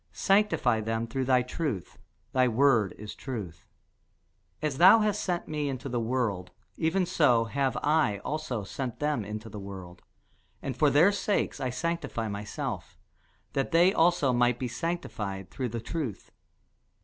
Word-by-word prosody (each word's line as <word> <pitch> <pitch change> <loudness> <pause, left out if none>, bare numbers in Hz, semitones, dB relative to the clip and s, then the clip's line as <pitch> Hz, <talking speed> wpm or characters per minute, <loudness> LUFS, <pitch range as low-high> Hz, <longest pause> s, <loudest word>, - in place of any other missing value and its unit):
Sanctify 195 - +2
them 115 +1 -1
through 130 +3 -2
thy 125 -1 +3
truth: 125 - -4 0.3
thy 130 -1 +3
word 120 -4 +3
is 105 0 -7
truth. 105 - -7 0.9
As 150 -3 -2
thou 190 +6 +8
hast 210 -1 0
sent 175 -2 -2
me 150 -2 -2
into 130 0 -5
the 125 -2 -1
world, 110 -6 -1 0.3
even 180 +4 +1
so 135 -10 +3
have 135 +3 -1
I 150 -9 +2
also 145 -8 -3
sent 125 +5 -5
them 150 -6 0
into 105 +2 -6
the 105 -1 -8
world. 95 -3 -9 0.6
And 135 - -4
for 145 +4 +4
their 160 +8 +5
sakes 205 0 -1
I 130 - -1
sanctify 125 -5 -2
myself, 105 - -5 0.6
that 135 - 0
they 175 +3 +5
also 165 -6 +3
might 120 0 +3
be 125 - -3
sanctified 110 - -4
through 130 -3 -3
the 115 +1 -4
truth. 130 - -5
130 Hz, 150 wpm, -28 LUFS, 110-155 Hz, 0.9 s, thou